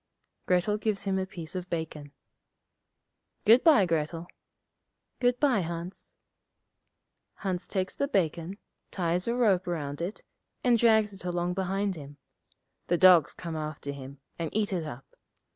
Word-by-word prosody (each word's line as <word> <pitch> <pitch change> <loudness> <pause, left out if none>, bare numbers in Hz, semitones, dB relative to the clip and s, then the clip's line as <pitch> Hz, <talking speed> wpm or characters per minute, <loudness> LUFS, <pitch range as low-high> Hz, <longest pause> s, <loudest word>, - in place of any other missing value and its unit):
Grettel 180 +4 +2
gives 210 -2 -1
him 195 -1 0
a 190 - -2
piece 170 -4 -8
of 185 -1 -5
bacon. 155 -3 -4 1.3
'Good 230 +4 +7
bye, 290 - +6
Grettel.' 165 0 -1 0.9
'Good 245 0 +2
bye, 275 -7 +3
Hans.' 170 +2 -6 1.3
Hans 185 -3 -3
takes 190 -2 -2
the 280 - 0
bacon, 175 - -1 0.3
ties 180 +1 -1
a 235 - +1
rope 200 -7 +2
round 145 -4 -3
it, 180 +5 -4 0.4
and 240 -2 +4
drags 220 -3 +4
it 195 - -11
along 175 0 -1
behind 195 +1 -1
him. 145 -2 -10 0.7
The 175 - +2
dogs 180 -4 +6
come 170 -2 -6
after 155 -2 -4
him, 140 0 -9 0.2
and 165 -2 -2
eat 210 -2 +1
it 170 -4 -1
up. 135 -2 -8
180 Hz, 145 wpm, -28 LUFS, 165-205 Hz, 1.3 s, Good